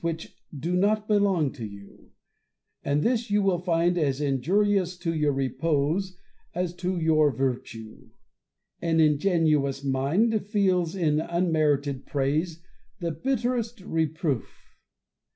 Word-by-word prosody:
71 165 -1 0
■which 160 - -12 0.3
do 170 +6 -1
not 210 +3 +1
belong 195 -9 +2
to 125 - -9
you; 100 -2 -11 0.7
and 145 +1 +1
this 235 -2 0
you 205 0 +2
will 190 -3 +2
find 175 0 +1
as 140 -3 0
injur 150 +9 +1
ious 185 -3 0
to 170 -1 -2
your 150 -2 +1
repose 145 +7 -1 0.4
as 180 -1 -1
to 180 0 -2
your 155 -2 +3
virtue. 120 -4 -4 0.7
An 165 -1 +1
ingenuous 150 -3 +2
mind 155 - +1
feels 185 -5 +1
in 155 -5 +1
unmerited 155 -5 0
praise 155 +4 -1 0.4
the 170 -2 -2
bitterest 240 - -2
reproof. 160 - -3
165 Hz, 125 wpm, -26 LUFS, 145-185 Hz, 0.7 s, your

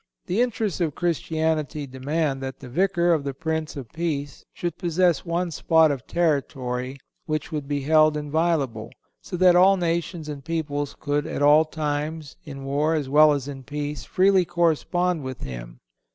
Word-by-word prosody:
The 195 +7 0
interests 220 -6 -1
of 155 -4 0
Christianity 160 -3 -1
demand 135 +2 -2
that 130 0 -5
the 130 - -10
Vicar 175 +3 +2
of 155 -3 0
the 140 -1 -4
Prince 160 +1 -3
of 130 -6 -8
Peace 150 -4 -3
should 175 -2 -4
possess 175 -2 +2
one 170 +1 -1
spot 160 0 +4
of 135 -3 -5
territory 135 -6 -1 0.3
which 155 -2 -2
would 150 -3 -4
be 145 0 -1
held 155 +1 +4
inviolable, 150 -7 -1 0.3
so 180 - -6
that 180 0 +6
all 190 +2 +6
nations 170 -2 -2
and 145 -2 -6
peoples 145 -3 -3
could 145 0 -1
at - - -2
all 150 +2 +6
times, 155 -1 -3
in 135 -3 -8
war, 150 +4 +1
as 145 -4 -2
well 150 +2 +6
as 140 -2 -1
in 135 -2 -7
peace, 145 0 -5
freely 190 0 +3
correspond 175 0 +1
with 130 -2 -6
him. - - -7
155 Hz, 165 wpm, -24 LUFS, 140-170 Hz, 0.3 s, that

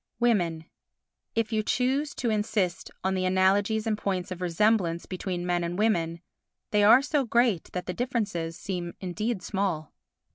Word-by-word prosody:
Women 175 -9 +1 0.7
If 225 0 0
you 215 - +2
choose 265 +6 0
to 235 -3 -1
insist 210 -4 -1
on 190 0 +1
the 185 -1 0
analogies 195 +4 +2
and 220 -1 +1
points 190 -3 -2
of 185 0 -5
resemblance 180 -1 +1
between 180 -1 -4
men 175 -1 0
and 170 +1 -3
women, 170 -6 +1 0.5
they 210 -1 +3
are 240 +6 +7
so 295 -1 +1
great 235 -6 +2
that 180 - -3
the 180 - -3
differences 200 -8 -2
seem 175 -3 -4
indeed 195 +2 -3
small. 185 -7 -2
195 Hz, 155 wpm, -27 LUFS, 175-220 Hz, 0.7 s, are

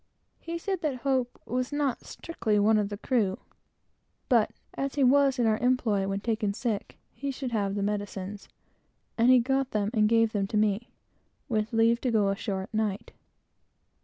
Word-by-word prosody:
He 335 0 -5
said 380 +1 -3
that 300 -5 -1
Hope 260 -3 0
was 255 +2 -2
not 290 -3 -1
strictly 220 -10 -2
one 215 +1 +4
of 205 -1 -1
the 205 - -5
crew, 210 -5 0 0.9
but 235 -5 +4 0.2
as 275 +1 -3
he 285 - +2
was 275 +1 +4
in 240 - +2
our 220 0 +2
employ 235 -6 +1
when 195 0 -2
taken 215 -2 -1
sick, 225 -4 -3 0.2
he 280 - -4
should 265 -2 -4
have 200 -3 0
the 200 - -1
medicines; 205 -1 -4 0.7
and 235 +2 +3
he 255 - +8
got 265 +2 +1
them 210 -2 -1
and 215 -2 +3
gave 225 -1 +3
them 200 -2 -1
to 210 - -1
me, 210 +2 +1 0.6
with 215 -4 -1
leave 230 +1 +3
to 255 - 0
go 210 -4 +2
ashore 195 -1 -2
at 195 - -12
night. 215 -2 -2
225 Hz, 180 wpm, -28 LUFS, 205-255 Hz, 0.9 s, he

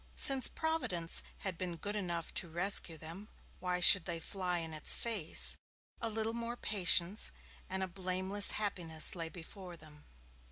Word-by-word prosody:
Since 270 -3 +6
Providence 255 - -2 0.2
had 185 -4 -5
been 180 -2 -6
good 205 +4 -6
enough 175 -5 -5
to 170 - -1
rescue 175 -1 +1
them, 165 +7 -11 0.3
why 180 -1 -3
should 180 -1 +6
they 170 -2 -5
fly 180 +1 -4
in 165 -1 -5
its 155 - +2
face? 210 -9 +2 0.4
A 230 - -3
little 220 +1 -4 0.2
patience, 190 -2 +2 0.4
and 190 0 -3
a - - -4
blameless 185 +2 +3
happiness 170 -7 0
lay 165 -2 -6
before 180 +1 -12
them. 150 -1 -16
180 Hz, 150 wpm, -32 LUFS, 165-205 Hz, 0.4 s, Since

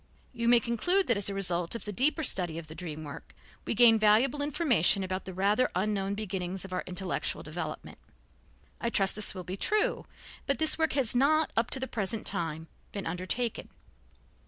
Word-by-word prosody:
You 235 -1 -2
may 240 0 +6
conclude 245 - 0
that 235 - +1
as 200 0 0
a 200 - -4
result 175 -1 +1
of 230 - -6
the 210 - -4
deeper 300 - +1
study 175 - 0
of 165 - -7
the 155 - -10
dream 155 -2 -7
work 145 -2 -10 0.3
we - - -2
gain 225 -1 +7
valuable 225 +7 +3
information 265 - +2
about 185 0 -4
the 190 - -6
rather 205 +7 +2
unknown 195 +1 -1
beginnings 190 -3 -4
of 190 - -9
our 185 - -2
intellectual 180 0 -2
development. - - -7 0.8
I 235 - -1
trust 195 -4 +1
this 210 -2 0
will 185 - -6
be 185 +2 -6
true, 425 - 0 0.4
but 280 - +1
this 315 -1 +4
work 320 -1 +1
has 265 -6 +4
not, 310 +5 +2
up 230 +2 +1
to 265 - +2
the 260 - -2
present 215 -1 -2
time, 160 -4 -2 0.2
been 200 - -6
undertaken. 185 +7 -2
205 Hz, 190 wpm, -29 LUFS, 185-245 Hz, 0.8 s, gain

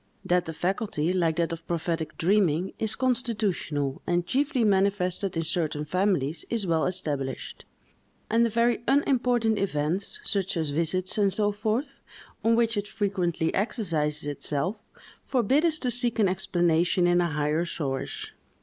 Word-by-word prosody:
That 180 0 +2
the 165 - -4
faculty, 180 -2 -1
like 170 -3 +1
that 170 0 0
of 165 0 -7
prophetic 165 -2 -2
dreaming, 180 -1 +2
is 220 -1 -1
constitutional, 210 - -1
and 175 0 +1
chiefly 270 - +1
manifested 195 -2 +1
in 165 - 0
certain 155 -2 0
families, 175 -3 0
is 230 -4 0
well 165 -3 +1
established; 145 -8 -3 0.6
and 230 +1 +3
the 235 - +2
very 235 +1 +1
unimportant 245 -5 +2
events, 185 - -1
such 195 - 0
as 160 -3 -1
visits, 175 +6 0
and 200 -1 +3
so 205 +1 +1
forth, 220 +7 -2 0.4
on 230 +1 +4
which 230 -1 +1
it 205 0 -2
frequently 185 -6 -1
exercises 160 - 0
itself, 145 +5 -1 0.5
forbid 265 +4 +2
us 320 -2 +2
to 250 -5 -2
seek 240 0 +2
an 210 -3 +4
explanation 175 -1 +1
in 175 0 +4
a 175 - +1
higher 150 +2 0
source. 140 -6 -4
185 Hz, 150 wpm, -26 LUFS, 165-220 Hz, 0.6 s, on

